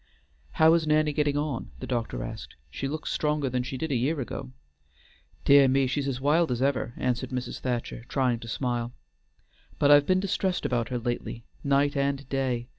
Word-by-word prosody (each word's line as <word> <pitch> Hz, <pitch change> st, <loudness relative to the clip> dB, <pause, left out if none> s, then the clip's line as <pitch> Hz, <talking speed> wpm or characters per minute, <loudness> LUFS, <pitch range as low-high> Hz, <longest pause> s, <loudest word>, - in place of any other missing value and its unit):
"How 160 Hz, +1 st, +6 dB
is 165 Hz, -2 st, +2 dB
Nanny 150 Hz, 0 st, +3 dB
getting 145 Hz, -1 st, +1 dB
on?" 145 Hz, -, -2 dB
the -, -, -5 dB
doctor 115 Hz, -, -2 dB
asked. -, -, -8 dB, 0.2 s
"She 135 Hz, -, -3 dB
looks 155 Hz, +3 st, -4 dB
stronger 150 Hz, -2 st, 0 dB
than 125 Hz, 0 st, 0 dB
she 130 Hz, +2 st, -5 dB
did 160 Hz, +2 st, -3 dB
a -, -, +1 dB
year 140 Hz, +6 st, 0 dB
ago." 110 Hz, -, -5 dB, 0.9 s
"Dear 140 Hz, -1 st, +7 dB
me, 135 Hz, +1 st, +3 dB
she's 135 Hz, 0 st, -1 dB
wild 150 Hz, +4 st, +3 dB
as 120 Hz, -, -1 dB
ever," 130 Hz, -3 st, 0 dB
answered 125 Hz, 0 st, -1 dB
Mrs. 125 Hz, -1 st, -4 dB
Thacher, 120 Hz, -2 st, -3 dB
trying 125 Hz, -4 st, +1 dB
to 115 Hz, -, -9 dB
smile; 120 Hz, 0 st, -2 dB, 0.8 s
"but 145 Hz, -, +4 dB
I've 145 Hz, 0 st, +7 dB
been 185 Hz, 0 st, +3 dB
distressed 190 Hz, -1 st, -1 dB
about 120 Hz, -2 st, 0 dB
her 125 Hz, -, -1 dB
lately, 120 Hz, -1 st, -4 dB, 0.2 s
night 140 Hz, +1 st, +2 dB
and 140 Hz, 0 st, -1 dB
day. 130 Hz, -3 st, -1 dB
135 Hz, 185 wpm, -27 LUFS, 125-145 Hz, 0.9 s, Dear